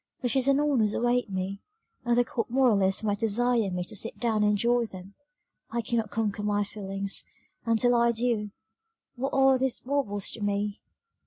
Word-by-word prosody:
"Riches 255 +1 +2
and 275 0 +4
honours 260 -8 +1
await 240 -1 +1
me, 190 +1 -4 0.4
and 240 0 +2
the 245 - +4
cold 230 0 -3
moralist 220 -6 +2
might 205 -1 -1
desire 230 0 +1
me 180 -1 -3
to 215 +5 -9
sit 225 +3 -1
down 225 -3 0
and 210 0 +3
enjoy 235 +3 +2
them 190 -2 -11 0.6
I 235 +1 -2
cannot 225 -2 -1
conquer 215 -2 -2
my 205 0 0
feelings, 195 -1 -1 0.4
and 230 0 +3
till 245 +2 +3
I 235 0 +4
do, 230 -2 -1 0.7
what 265 +2 -2
are 270 -1 +4
these 265 -1 0
baubles 245 -8 -1
to 225 - -8
me? 205 0 -2
225 Hz, 175 wpm, -27 LUFS, 205-245 Hz, 0.7 s, and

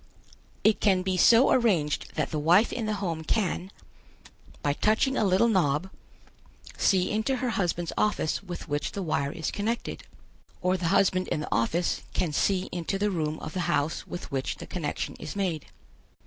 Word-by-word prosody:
It 215 0 +3
can 190 -3 +3
be 190 0 0
so 230 +7 +6
arranged 180 - +1
that 155 - -1
the 155 - -1
wife 175 +9 +4
in 225 -3 -2
the 215 - 0
home 170 -5 -3
can, 190 0 -1 0.9
by 145 - +2
touching 220 - +2
a - - +2
little 195 +3 +4
knob, 180 -4 +1 0.8
see 185 -2 +2
into 220 +5 0
her 250 -1 -1
husband's 175 -4 -1
office 210 -7 0
with 180 -4 -7
which 145 -1 -2
the 200 - -3
wire 140 -4 -1
is 160 -1 -3
connected, 225 +3 -3 0.6
or 180 +1 +1
the 180 -2 -2
husband 185 0 +2
in - - -1
the - - -6
office 160 +10 0
can 165 -5 0
see 190 +3 +1
into 175 +2 -2
the 205 +1 0
room 155 -3 -2
of 155 - -6
the 185 - -3
house 150 -1 0
with 175 - -7
which 135 -1 -2
the - - -9
connection 160 -5 -4
is 155 - -7
made. 180 -7 -2
185 Hz, 175 wpm, -27 LUFS, 160-205 Hz, 0.9 s, so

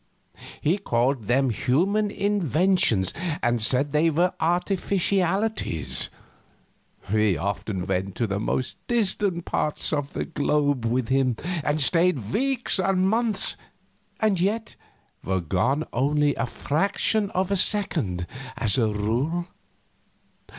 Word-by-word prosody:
He 175 +7 +1
called 125 - 0
them 130 +1 +2
human 190 - +1
inventions, 185 - +2 0.3
and 120 -1 +1
said 130 +5 +2
they 155 +3 +3
were 175 +4 +1
artificialities. 185 - 0 1.0
We 105 -5 +2
often 95 +1 -3
went 95 0 -2
to 120 - 0
the 100 -1 -2
most 125 +4 -2
distant 200 -6 +1
parts 150 +1 -1
of 145 -1 -2
the - - -3
globe 145 -5 0
with 125 +1 -1
him, 130 -2 +2 0.3
and 150 +1 0
stayed 155 - +2
weeks 260 -4 +2
and 190 0 +2
months, 220 -1 +1 0.6
and 210 -4 +1
yet 215 +4 -1 0.5
were 95 0 -1
gone 95 - 0
only 145 +3 +2
a 115 - -2
fraction 200 - 0
of 185 +1 0
a - - +2
second, 155 - 0 0.3
as 105 +1 +3
a 115 - +2
rule. 120 - -1
150 Hz, 120 wpm, -24 LUFS, 115-190 Hz, 1.0 s, they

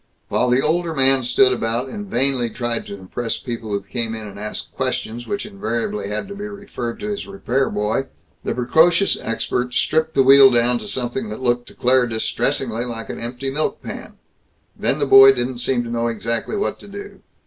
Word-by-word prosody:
While 125 - +1
the 125 +2 +3
older 165 +1 0
man 135 -1 +5
stood 130 +1 +4
about 120 +2 -1
and 205 +8 -7
vainly 130 -5 +1
tried 120 -1 -3
to 100 - -6
impress 110 +5 -4
people 115 -3 -6
who 100 -1 -1
came 115 +3 -3
in 110 -1 -6
and 100 -1 -9
asked 105 +1 -6
questions 120 +2 -3
which 205 0 -3
invariably 115 - -3
had 105 - -4
to - - -6
be 205 +1 -6
referred 200 - -6
to 210 - -4
his 205 -1 -4
repair 135 -9 -1
boy, 105 +6 -1 0.4
the - - -2
precocious 160 +10 +3
expert 125 +2 -2
stripped 160 0 +1
the 135 - +5
wheel 135 0 +8
down 120 0 +3
to - - -8
something 120 -2 -3
that 110 +4 -7
looked 120 -1 0
to - - -14
Claire 125 0 +3
distressingly 120 +1 -1
like 115 -2 -4
an - - -7
empty 125 +3 -4
milk 150 +3 -2
pan. - - -8 0.6
Then 135 - 0
the 145 - +1
boy 135 0 +9
didn't 125 -1 -3
seem 120 -1 +1
to 120 - -7
know 120 0 0
exactly 115 - -2
what 205 - -2
to - - -13
do. 200 0 -10
125 Hz, 200 wpm, -20 LUFS, 115-135 Hz, 0.6 s, boy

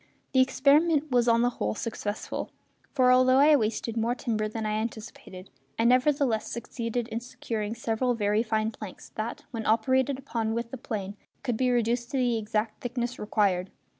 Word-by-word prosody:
The 260 - +4
experiment 295 +3 +3
was 245 -1 +3
on 230 0 +4
the 245 - +2
whole 105 - -2
successful; 215 -2 -4 0.4
for 255 -3 +4
although 255 +1 +5
I 295 +2 +7
wasted 225 -2 -1
more 230 +2 0
timber 220 -4 -1
than 220 +1 -4
I 215 - -1
anticipated 215 -4 -6 0.3
I 225 - +1
nevertheless 255 -1 +3
succeeded 235 0 -3
in 225 - -2
securing 225 -3 -4
several 240 +2 0
very 210 0 +1
fine 220 -1 0
planks 210 -3 -10
that, 215 +2 -5
when 225 -3 -4
operated 260 +4 +2
upon 230 -4 -2
with 235 0 -3
the 265 - -5
plane, 205 -4 -5 0.3
could 245 -3 -1
be 255 +2 +1
reduced 240 0 +1
to 275 - -2
the 245 -3 +1
exact 215 0 -2
thickness 245 0 -3
required. 195 -3 +1
230 Hz, 170 wpm, -27 LUFS, 215-255 Hz, 0.4 s, I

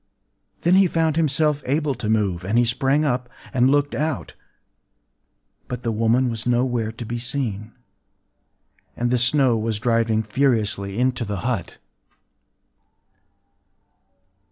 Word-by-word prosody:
Then 175 - +3
he 190 0 +6
found 160 -2 0
himself 150 -1 +2
able 145 +2 0
to 110 -3 -5
move; 100 -5 0
and 105 +5 0
he 120 - +4
sprang 135 +5 +1
up, 125 -3 -1 0.2
and 130 0 +3
looked 145 0 +1
out. 145 - -3 1.3
But 125 0 -6
the 115 - -1
woman 115 +4 +2
was 115 -1 -4
nowhere 120 -2 0
to 115 +1 -8
be 120 +2 -4
seen; 115 -4 -3 1.3
and 120 0 0
the 125 - +2
snow 125 -2 +3
was 110 -1 -1
driving 115 -1 +1
furiously 105 -4 0
into 125 0 0
the 100 -4 -4
hut. 115 -10 -3
120 Hz, 130 wpm, -22 LUFS, 110-135 Hz, 1.3 s, he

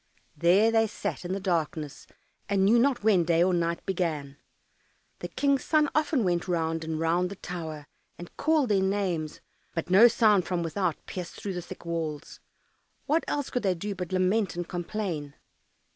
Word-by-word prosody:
There 190 +6 +4
they 225 -1 +3
sat 195 - -5
in 175 - -4
the 195 - -1
darkness, 160 -5 -2 0.4
and 195 -1 +2
knew 230 +4 +5
not 260 -2 +2
when 205 -5 +4
day 165 0 +3
or 185 0 +2
night 170 -1 -1
began. 155 -7 -2 0.8
The - - -5
King's 280 -1 +1
son 305 -2 +2
often 300 -4 +1
went 175 -1 0
round 165 -2 -1
and 160 -1 -3
round 170 +3 +1
the 200 - -7
tower, 160 -5 -6 0.3
and 175 - -11
called 310 -5 +2
their 200 -2 +3
names, 190 -5 -1 0.3
but 165 +1 -3
no 205 +6 +8
sound 215 -6 +3
from 175 -2 -1
without 170 0 -2
pierced 180 -2 -6
through 200 - -4
the 175 - -4
thick 175 - -11
walls. 160 -3 -4 0.7
What 315 +3 +1
else 285 -2 -2
could 250 - -1
they 190 -3 +1
do 200 +4 -4
but 180 -2 -6
lament 185 +1 +1
and 175 0 -4
complain? 175 -5 -4
180 Hz, 175 wpm, -27 LUFS, 165-210 Hz, 0.8 s, no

